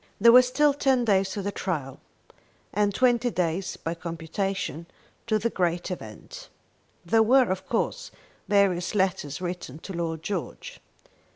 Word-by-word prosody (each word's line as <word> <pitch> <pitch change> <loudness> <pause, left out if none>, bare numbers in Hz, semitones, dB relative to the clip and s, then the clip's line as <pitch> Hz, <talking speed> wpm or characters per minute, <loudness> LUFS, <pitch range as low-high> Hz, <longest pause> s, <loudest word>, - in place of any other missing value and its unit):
There 230 +3 +7
were 250 +1 +9
still 280 +4 +2
ten 265 -3 +2
days 195 -3 +2
to 200 - -4
the 200 - -2
trial, 145 -10 -4 0.7
and 205 0 +2
twenty 245 +2 +2
days, 180 -2 -2
by 165 - -4
computation, 170 0 -4 0.4
to 215 -2 +2
the 230 +2 -1
great 175 0 -1
event. 110 - -9 0.6
There 225 +6 +4
were, 250 0 +4
of 190 0 -4
course, - - -1 0.4
various 195 -3 +2
letters 185 -6 -1
written 175 -6 -5
to 190 +4 -9
Lord 165 -2 -3
George. 190 -3 -5
190 Hz, 145 wpm, -26 LUFS, 170-225 Hz, 0.7 s, were